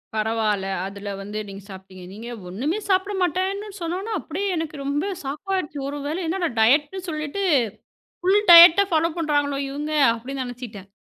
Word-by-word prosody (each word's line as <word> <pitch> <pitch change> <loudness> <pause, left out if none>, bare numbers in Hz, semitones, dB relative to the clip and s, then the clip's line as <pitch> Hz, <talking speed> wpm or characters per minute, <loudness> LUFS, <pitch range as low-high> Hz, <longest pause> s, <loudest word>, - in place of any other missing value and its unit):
பரவாயில்ல. 215 -2 0 0.2
அதுல 200 +1 -7
வந்து 210 +2 -5
நீங்க 195 0 -9
சாப்பிட்டீங்க. 190 -1 -11
நீங்க 225 +4 -9 0.2
ஒண்ணுமே 285 - -2
சாப்பிட 380 +2 +1
மாட்டேன்னு 380 +4 -1
சொன்னவுனே 370 +6 -3
அப்படியே 380 +6 -4
எனக்கு 320 -1 -4
ரொம்ப 285 +2 -1 0.2
ஷாக் 295 +8 -5
ஆயிடுச்சு. 300 -5 -3
ஒருவேள 290 +2 -4
என்னட 345 +1 -1
டயட்ன்னு 290 +10 +3
சொல்லிட்டு 305 +5 -3 0.8
ஃபுல் 385 +3 +4
டயட்ட 340 +3 +10
ஃபாலோ 330 +1 +2
பண்றாங்களோ 290 -3 0
இவங்க 295 +2 -4 0.2
அப்படின்னு 260 +3 -5
நினைச்சிட்டேன். 235 -6 -9
295 Hz, 140 wpm, -23 LUFS, 225-350 Hz, 0.8 s, டயட்ட